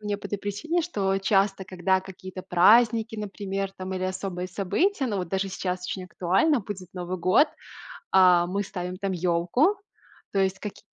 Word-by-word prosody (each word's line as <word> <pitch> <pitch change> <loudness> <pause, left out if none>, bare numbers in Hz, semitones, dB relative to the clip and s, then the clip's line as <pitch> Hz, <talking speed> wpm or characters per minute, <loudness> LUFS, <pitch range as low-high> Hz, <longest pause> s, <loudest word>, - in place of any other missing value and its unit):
мне 210 -1 -2
по - - -8
этой 205 - -3
причине, 295 - -2
что 195 - 0
часто, 195 0 +1
когда 185 +1 +1
какие-то 185 0 -9
праздники, 220 +5 +4
например, 195 -1 -4
там 185 0 -5
или 185 - -2
особые 185 -1 -3
события, 265 - 0
но 210 -4 -2
вот 180 -3 -3
даже 195 +1 -1
сейчас 185 -1 -3
очень 185 - -4
актуально, 195 - +2
будет 190 -3 -7
Новый 180 +1 -4
год. 185 - +4 0.6
А, 180 -2 +6
мы 200 +3 -1
ставим 180 -2 -5
там 195 0 -2
ёлку, 180 - +2 0.6
то 200 - 0
есть 190 0 +1
какие-то 210 - -7
195 Hz, 170 wpm, -26 LUFS, 185-205 Hz, 0.6 s, А